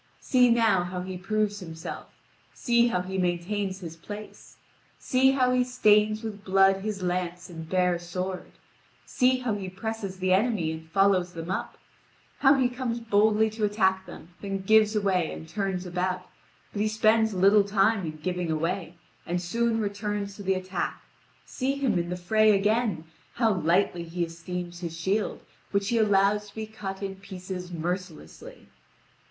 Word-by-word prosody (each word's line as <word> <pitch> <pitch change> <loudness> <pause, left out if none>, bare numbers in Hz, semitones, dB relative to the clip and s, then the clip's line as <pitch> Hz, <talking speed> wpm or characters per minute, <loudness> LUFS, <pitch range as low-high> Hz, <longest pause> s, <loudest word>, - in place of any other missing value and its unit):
See 250 -2 +4
now 225 -6 +3
how 180 0 -4
he 185 +1 -6
proves 205 +2 -1
himself, 165 -3 -7 0.5
see 235 -1 +3
how 180 -6 0
he 190 +1 -4
maintains 185 +2 -1
his 165 -2 -7
place, 205 +5 -10 0.4
see 265 +1 +3
how 255 -2 +2
he 250 0 +3
stains 215 -3 +3
with 210 -2 -6
blood 195 0 +4
his 200 -1 -4
lance 180 0 -3
and 160 -1 -8
bare 180 -2 +2
sword, 180 +2 -5 0.5
see 255 +1 +2
how 245 -3 -1
he 195 -2 -4
presses 200 0 -5
the 185 0 +1
enemy 195 -5 +1
and 160 0 -8
follows 190 -1 +2
them 165 +2 -5
up, - - -4 0.6
how 270 +1 +6
he 260 -2 +3
comes 245 -1 -3
boldly 220 -1 +3
to 220 0 -5
attack 190 -3 +1
them, 170 -1 -11
then 195 -1 -4
gives 215 +1 +4
away 190 -5 +1
and 160 - -8
turns 190 0 -2
about; 180 +1 -2 0.5
but 205 - -2
he 215 - +2
spends 220 0 +3
little 200 +3 +5
time 200 +1 +2
in 155 -2 -5
giving 180 -1 -2
away, 165 +2 -2 0.3
and 175 +1 0
soon 225 +6 0
returns 205 -1 -3
to 205 - -9
the 190 -1 +1
attack. 185 -1 -4 0.4
See 265 +1 -2
him 260 -10 +1
in 170 0 -3
the 180 - -3
fray 215 +3 +4
again, 210 -4 +1 0.3
how 230 -3 +3
lightly 175 +1 +1
he 170 +1 -3
esteems 175 +1 -6
his 165 -2 -6
shield, 195 +5 -1 0.3
which 200 0 0
he 235 - +2
allows 205 0 +3
to - - -20
be 220 0 -4
cut 200 -3 -7
in 195 -1 -4
pieces 185 -2 -7
mercilessly. 180 - -6
195 Hz, 165 wpm, -27 LUFS, 180-215 Hz, 0.6 s, how